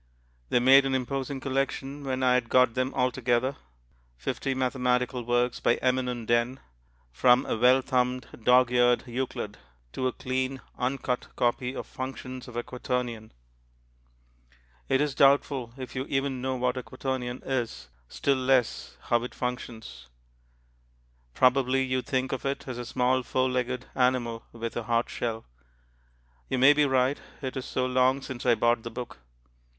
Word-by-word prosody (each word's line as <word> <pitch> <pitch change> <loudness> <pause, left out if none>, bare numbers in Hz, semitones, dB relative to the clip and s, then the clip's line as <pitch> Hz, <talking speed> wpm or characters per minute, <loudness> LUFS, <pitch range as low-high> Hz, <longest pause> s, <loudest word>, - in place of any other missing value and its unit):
They - - +3
made 135 +3 +7
an 135 - 0
imposing 135 +1 -2
collection 135 +1 -2
when 130 -1 -2
I 125 -1 +4
had 125 -2 +1
got 125 -2 +4
them 130 +1 -1
all 125 -1 +2
together; 130 +2 0 0.6
fifty 130 - -2
mathematical 125 -1 0
works 120 +1 +1
by 120 - +3
eminent 125 -2 -1
Den, 120 +3 +1 0.5
from 125 - +4
a - - -1
well 125 +3 +4
thumbed, 125 -1 0 0.2
dog's 125 +1 +5
eared 120 0 +4
Euclid 120 -4 -4 0.3
to 130 - -1
a - - 0
clean 130 +1 -2 0.2
uncut 125 -1 -2
copy 125 +2 0
of - - -5
Functions 130 -2 -7
of 125 - -11
a 120 - -2
Quaternion. 125 -3 -4 1.6
It 135 - +3
is 150 -2 0
doubtful 135 -3 +3
if 130 -1 -8
you 130 +1 -2
even 135 -1 -1
know 130 0 -1
what 125 0 0
a - - -2
quaternion 130 -1 -4
is, 115 - -3 0.2
still 140 - +1
less 130 -2 +1
how 120 -1 +1
it 125 - -7
functions; 120 - -5 1.3
probably 130 +1 +3
you 130 0 0
think 130 +1 -1
of 135 - -3
it 140 0 -3
as 125 -2 -5
a 120 - -5
small 125 +1 +1
four 130 +1 0
legged 125 0 -2
animal 125 -3 0
with 115 0 -5
a 120 - -1
hard 115 +1 0
shell. 115 -2 -3 1.0
You - - 0
may 135 +3 +7
be 145 0 +3
right 130 +1 +2 0.2
it 130 - -3
is 130 - -4
so 130 - -1
long 130 +1 +2
since 130 -1 -6
I 120 - +6
bought 120 +1 +2
the 115 - -6
book. 120 - -7
125 Hz, 160 wpm, -27 LUFS, 120-130 Hz, 1.6 s, made